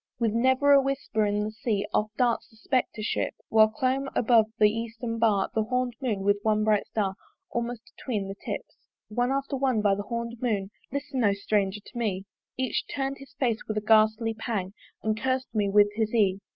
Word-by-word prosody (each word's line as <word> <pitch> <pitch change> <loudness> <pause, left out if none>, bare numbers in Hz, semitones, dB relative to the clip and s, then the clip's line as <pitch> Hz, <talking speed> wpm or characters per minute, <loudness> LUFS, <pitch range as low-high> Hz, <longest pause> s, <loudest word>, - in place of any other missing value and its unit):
With 225 -3 +1
never 260 +4 +3
a 280 -1 +8
whisper 270 -6 0
in 205 0 0
the 215 - -3
Sea 215 -2 -1
Off 215 - +1
darts 240 -2 +1
the - - -22
Spectre 230 -2 -1
ship; - - -1
While 220 -1 +6
clombe 260 +4 -1
above 225 -2 +4
the 210 -1 +5
Eastern 230 +1 -4
bar 215 -4 +2
The 220 - +2
horned 250 +1 0
Moon, 220 -7 -1
with 205 +1 +2
one 215 0 +2
bright 215 -1 +2
Star 200 -3 -1 0.4
Almost 235 0 -4
atween 210 -7 -3
the 195 - -4
tips. 200 - -7 0.3
One 245 +4 0
after 275 +1 -1
one 260 -4 +1
by 200 -1 +4
the 200 - -2
horned 235 +2 -5
Moon 205 -5 -1 0.2
(Listen, 280 -2 -2
O 200 -2 +4
Stranger! 200 0 0
to 245 - -11
me) 195 -4 -1 0.3
Each 260 -2 0
turn'd 275 -1 -3
his 275 -1 -13
face 235 -4 +1
with 215 - -2
a - - +1
ghastly 220 +1 +4
pang 215 -4 -3 0.3
And 215 -1 -1
curs'd 260 0 -1
me 205 -2 +1
with 205 +1 +5
his 220 0 -1
ee. 195 -4 +3
220 Hz, 200 wpm, -27 LUFS, 210-250 Hz, 0.4 s, a